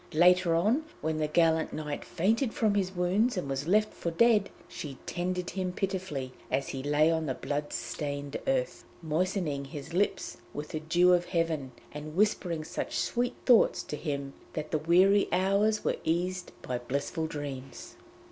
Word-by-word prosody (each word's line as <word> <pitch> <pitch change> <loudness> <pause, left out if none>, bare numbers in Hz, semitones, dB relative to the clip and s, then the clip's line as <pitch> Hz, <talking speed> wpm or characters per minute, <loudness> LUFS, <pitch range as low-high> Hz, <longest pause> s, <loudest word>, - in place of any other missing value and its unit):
Later 180 0 +5
on, 220 - +2 0.2
when 160 0 -1
the 155 -1 0
gallant 160 +1 +2
knight 150 -2 -4
fainted 220 +7 0
from 215 -3 +2
his 190 -2 0
wounds 195 +6 +2
and 180 - -2
was 135 +2 -3
left 215 +3 +3
for 170 - -3
dead, 210 +3 +4 0.2
she 140 -4 -7
tended 180 0 -2
him 185 0 -2
pitifully 180 -9 -3 0.2
as 135 - -1
he 135 - -4
lay 150 +3 +3
on 160 -1 0
the 130 - -1
blood 145 0 -3
stained 145 -1 -4
earth, - - 0 0.2
moistening 160 -3 -1
his 140 +3 -8
lips 200 +4 0 0.2
with 150 +1 -5
the 155 - -3
dew 175 +3 +4
of 175 0 +3
heaven, 160 -6 -1 0.2
and 150 +1 -7
whispering 180 -5 +1
such - - -4
sweet 245 +1 0
thoughts 245 -4 +5
to - - -5
him 140 -3 -4 0.2
that 155 -1 -4
the 155 - +1
weary 185 +6 +5
hours 200 +3 +2
were - - +1
eased 180 +2 -1
by 125 -1 -2
blissful 140 +6 -2
dreams. 140 -4 -7
165 Hz, 165 wpm, -29 LUFS, 150-190 Hz, 0.2 s, Later